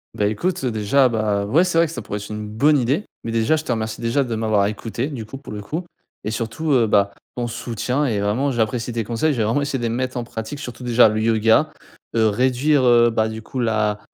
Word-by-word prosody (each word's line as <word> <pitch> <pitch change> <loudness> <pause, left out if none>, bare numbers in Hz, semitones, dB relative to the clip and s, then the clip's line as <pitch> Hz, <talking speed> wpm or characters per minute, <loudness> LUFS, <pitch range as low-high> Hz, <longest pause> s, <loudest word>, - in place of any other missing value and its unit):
Bah, 105 - +1
écoute, 175 - -2
heu, 130 - +1
déjà, 120 +4 +3
bah, 105 -3 0
ouais, 155 +11 +4
c'est 180 -3 +1
vrai 165 - +4
que - - -8
ça 120 - -6
pourrait 105 +1 -4
être 105 - -9
une 105 0 -5
bonne 145 +8 +3
idée, 135 - 0 0.2
mais 115 - -4
déjà, 115 +6 +2
je 155 - -3
te 125 - -3
remercie 110 -1 -2
déjà 120 +4 +1
de 120 -3 -3
m'avoir 110 -2 +2
écouté, 115 +4 -3
du 130 -7 -6
coup 110 +5 -8
pour 140 - -11
le 105 - -5
coup 160 - -4 0.4
et - - -2
surtout, 115 +8 -3
heu, 120 -4 +4
bah, 100 -1 +2 0.2
ton 120 -1 -2
soutien 125 +5 -2
et 110 -6 0
vraiment 120 +8 0
j'apprécie 120 0 -1
tes 115 -1 -1
conseils. 120 +8 0
Je 125 - -3
vais - - +2
vraiment 115 +7 +1
essayer 140 -2 -2
de - - -5
les - - 0
mettre 130 +2 -2
en 120 - -2
pratique 115 +5 -6
surtout 125 -4 -8
déjà 120 -2 +5
le 110 - -1
yoga, 115 +7 +3 0.4
heu, 110 -1 +4
réduire, 130 +6 +2
heu, 120 -1 +6
bah, 110 -1 +1
du 110 0 -6
coup, 125 +4 -6
là 110 -3 +1
115 Hz, 255 wpm, -21 LUFS, 110-135 Hz, 0.4 s, heu